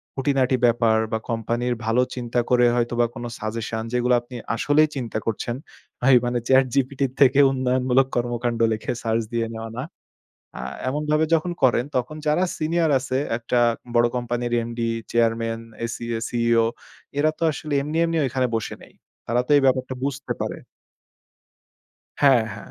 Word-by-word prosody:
খুঁটিনাটি 135 Hz, -1 st, +1 dB
ব্যাপার 115 Hz, -1 st, +3 dB
বা 110 Hz, -, 0 dB
কোম্পানির 120 Hz, +2 st, -1 dB
ভালো 115 Hz, +2 st, +3 dB
চিন্তা 120 Hz, -1 st, -2 dB
করে 125 Hz, -1 st, +4 dB
হয়তোবা 120 Hz, 0 st, +1 dB
কোন 120 Hz, -, -6 dB, 0.2 s
সাজেশন, 110 Hz, +1 st, -3 dB
যেগুলো 125 Hz, 0 st, +2 dB
আপনি 125 Hz, +1 st, -12 dB, 0.2 s
আসলেই 150 Hz, +5 st, +3 dB
চিন্তা 120 Hz, -5 st, -3 dB
করছেন। 115 Hz, +1 st, -2 dB, 0.5 s
ভাই, 130 Hz, +1 st, +6 dB
মানে 120 Hz, 0 st, 0 dB
চ্যাটজিপিটি 135 Hz, +1 st, +2 dB
থেকে 135 Hz, 0 st, +5 dB
উন্নয়নমূলক 130 Hz, 0 st, +2 dB
কর্মকাণ্ড 120 Hz, -1 st, -1 dB
লিখে 110 Hz, -, -3 dB
সার্চ 115 Hz, 0 st, +1 dB
দিয়ে 115 Hz, -1 st, 0 dB
নেওয়া 110 Hz, 0 st, -6 dB
না। 125 Hz, -, -2 dB, 0.8 s
আ -, -, -4 dB, 0.3 s
এমনভাবে 150 Hz, +3 st, +1 dB
যখন 165 Hz, +2 st, +2 dB
করেন, 125 Hz, -1 st, +4 dB
তখন 125 Hz, +5 st, -3 dB
যারা 150 Hz, +5 st, +3 dB
সিনিয়র 165 Hz, 0 st, +1 dB
আছে, 130 Hz, 0 st, -2 dB, 0.2 s
একটা 120 Hz, +1 st, 0 dB, 0.4 s
বড় 120 Hz, 0 st, +5 dB
কোম্পানির 120 Hz, 0 st, -2 dB
এমডি, 115 Hz, 0 st, -3 dB, 0.2 s
চেয়ারম্যান, 115 Hz, -1 st, +1 dB, 0.2 s
এসিএ, 115 Hz, 0 st, -4 dB
সিইও 115 Hz, -1 st, +2 dB, 0.5 s
এরা 155 Hz, +1 st, +3 dB
তো -, -, -3 dB
আসলে 150 Hz, 0 st, -5 dB
এমনি, 150 Hz, +3 st, -3 dB
এমনি 165 Hz, 0 st, -1 dB
ঐখানে 130 Hz, 0 st, 0 dB
বসে 110 Hz, -, -3 dB
নেই। -, -, -16 dB, 0.3 s
তারা 120 Hz, +1 st, +2 dB
তো -, -, -1 dB
এই -, -, +3 dB
ব্যাপারটা 130 Hz, 0 st, +1 dB
বুঝতে 140 Hz, 0 st, -3 dB
পারে। -, -, -3 dB, 1.6 s
হ্যাঁ, 135 Hz, -5 st, +6 dB
হ্যাঁ। 100 Hz, -, -11 dB
125 Hz, 150 wpm, -23 LUFS, 115-135 Hz, 1.6 s, ভাই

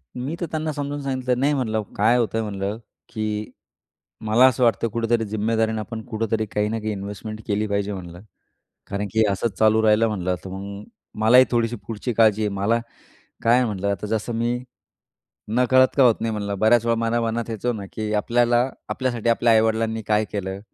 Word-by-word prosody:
मी 130 Hz, +6 st, -4 dB
तर 175 Hz, -, -2 dB
त्यांना 155 Hz, 0 st, -2 dB
समजावून 145 Hz, 0 st, -4 dB
सांगितलं. 130 Hz, -2 st, -1 dB
नाही 140 Hz, +3 st, +2 dB
म्हणलं 110 Hz, -6 st, -1 dB, 0.2 s
काय 115 Hz, +4 st, +4 dB
होतंय 115 Hz, -1 st, 0 dB
म्हणलं, 100 Hz, -1 st, -3 dB, 0.3 s
की 110 Hz, -1 st, -3 dB, 0.8 s
मला 115 Hz, +4 st, +6 dB
असं 125 Hz, 0 st, -2 dB
वाटतं 115 Hz, 0 st, +2 dB
कुठेतरी 115 Hz, 0 st, 0 dB
जिम्मेदारीनं 110 Hz, +1 st, 0 dB
आपण 110 Hz, +1 st, -6 dB
कुठेतरी 110 Hz, -1 st, -1 dB
काही 105 Hz, 0 st, -1 dB
ना 115 Hz, -, -2 dB
काही 110 Hz, 0 st, -3 dB
इन्व्हेस्टमेंट 105 Hz, +2 st, -6 dB
केली 105 Hz, +1 st, 0 dB
पाहिजे 100 Hz, 0 st, -1 dB
म्हटलं, 90 Hz, -2 st, -8 dB, 0.7 s
कारण 100 Hz, +1 st, -3 dB
की 110 Hz, 0 st, +4 dB
असंच 100 Hz, 0 st, -2 dB
चालू 110 Hz, 0 st, +4 dB
राहिलं 110 Hz, +1 st, +4 dB
म्हटलं 95 Hz, -4 st, -1 dB
तर 95 Hz, -, -7 dB
मग 100 Hz, +2 st, -7 dB, 0.4 s
मलाही 125 Hz, +3 st, +7 dB
थोडीशी 120 Hz, -1 st, +1 dB
पुढची 115 Hz, +2 st, -3 dB
काळजी 110 Hz, -1 st, +4 dB
आहे 105 Hz, -, +1 dB
मला 105 Hz, +4 st, +1 dB, 0.6 s
काय 115 Hz, +1 st, +5 dB
आहे 125 Hz, -, +3 dB
म्हटलं 100 Hz, -3 st, -3 dB
आता 100 Hz, +1 st, -4 dB
जसं 110 Hz, +2 st, -2 dB
मी 120 Hz, +1 st, 0 dB, 0.9 s
नकळत 125 Hz, +3 st, +4 dB
का 135 Hz, -, +6 dB
होत 120 Hz, -3 st, +5 dB
नाही 115 Hz, 0 st, -1 dB
म्हणलं 100 Hz, -2 st, -3 dB
बऱ्याच 115 Hz, +2 st, +4 dB
वेळा 115 Hz, 0 st, +2 dB
मला 115 Hz, +1 st, +1 dB
मनात 115 Hz, 0 st, -2 dB
येतं 115 Hz, +2 st, -2 dB
ना 100 Hz, -, -6 dB
की 110 Hz, -1 st, -3 dB
आपल्याला 120 Hz, +3 st, +2 dB, 0.2 s
आपल्यासाठी 120 Hz, -3 st, -1 dB
आपल्या 115 Hz, 0 st, +3 dB
आई-वडिलांनी 110 Hz, 0 st, +1 dB
काय 105 Hz, 0 st, +2 dB
केलं? 95 Hz, -1 st, -4 dB
110 Hz, 180 wpm, -23 LUFS, 105-120 Hz, 0.9 s, मलाही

